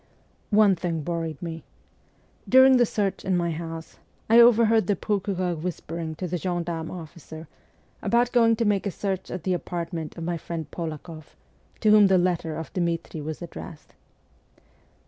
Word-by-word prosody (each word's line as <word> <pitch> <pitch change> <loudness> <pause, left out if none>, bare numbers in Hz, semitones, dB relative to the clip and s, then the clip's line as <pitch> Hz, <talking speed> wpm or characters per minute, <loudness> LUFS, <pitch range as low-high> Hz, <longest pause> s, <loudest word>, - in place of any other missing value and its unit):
One 205 -2 +5
thing 165 -3 -3
worried 165 -3 -3
me. 165 -1 -6 0.9
During 260 0 +7
the 240 -2 +4
search 200 -3 -2
in 190 -2 +1
my 170 -1 0
house, 165 0 -7 0.3
I 230 - +8
overheard 230 -2 +5
the 205 - +2
procureur 190 -2 -1
whispering 165 -1 -5
to 180 +3 -4
the 180 +1 -2
gendarme 170 -2 -3
officer 160 -2 -9 0.5
about 240 +1 +2
going 230 -2 +4
to 230 +1 -1
make 205 -1 +1
a - - 0
search 190 0 -3
at 180 - -5
the 185 - 0
apartment 170 -2 -4
of 165 - -5
my 170 0 -2
friend 165 0 -5
Polakoff, 160 -1 -7 0.5
to 215 - +4
whom 210 -1 +7
the 190 -1 +4
letter 175 -3 0
of 160 0 -7
Dmitri 170 -3 -2
was 155 +3 -6
addressed. 165 -1 -10
175 Hz, 160 wpm, -25 LUFS, 165-205 Hz, 0.9 s, I